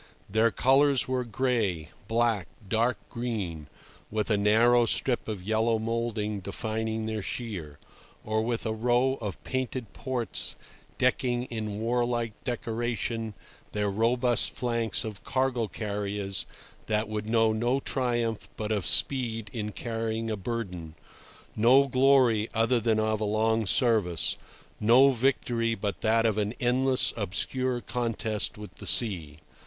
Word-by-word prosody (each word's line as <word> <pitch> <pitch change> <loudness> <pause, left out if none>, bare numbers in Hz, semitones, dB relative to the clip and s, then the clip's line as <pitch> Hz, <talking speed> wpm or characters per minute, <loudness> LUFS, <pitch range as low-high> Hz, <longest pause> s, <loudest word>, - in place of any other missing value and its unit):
Their 110 +3 +3
colours 135 +3 +3
were 130 -1 -1
gray, 110 -10 -1 0.2
black, 115 -4 +1 0.2
dark 115 +2 +1
green, 100 - -4 0.4
with 110 +1 -2
a - - +4
narrow 115 +4 +4
strip 125 +2 +1
of 105 -4 -5
yellow 110 +2 +1
moulding 110 -2 -2
defining 110 +3 -3
their 110 -1 -3
sheer, 95 - -5 0.5
or 110 0 0
with 115 +1 -2
a 110 - -1
row 120 +4 +1
of 95 -9 -6
painted 130 - -4
ports 125 -4 -3 0.4
decking 125 -1 +1
in 110 -3 -4
warlike 120 0 -1
decoration 115 -2 -3 0.4
their 105 -1 0
robust 120 +3 +3
flanks 115 -3 -1
of 105 -2 -7
cargo 130 -3 0
carriers 100 -2 -3 0.4
that 110 0 0
would 105 0 -4
know 115 -1 +3
no 120 +4 0
triumph 120 -5 -1
but 110 0 -3
of 100 -7 0
speed 115 - +4
in 105 -2 -4
carrying 115 0 -3
a - - -1
burden, 90 -7 -5 0.6
no 130 +5 +5
glory 130 -4 +3
other 115 +2 +2
than 110 -1 +1
of 110 0 0
a - - +1
long 110 +1 +1
service, 105 - +3 0.4
no 125 +6 +6
victory 120 -2 0
but 100 -4 -4
that 115 +1 +2
of 110 -1 +1
an 105 +2 -2
endless, 130 +1 +2
obscure 120 +5 -1
contest 115 -4 -1
with 105 -3 -10
the - - -5
sea. 85 -11 +3
115 Hz, 135 wpm, -27 LUFS, 105-120 Hz, 0.6 s, no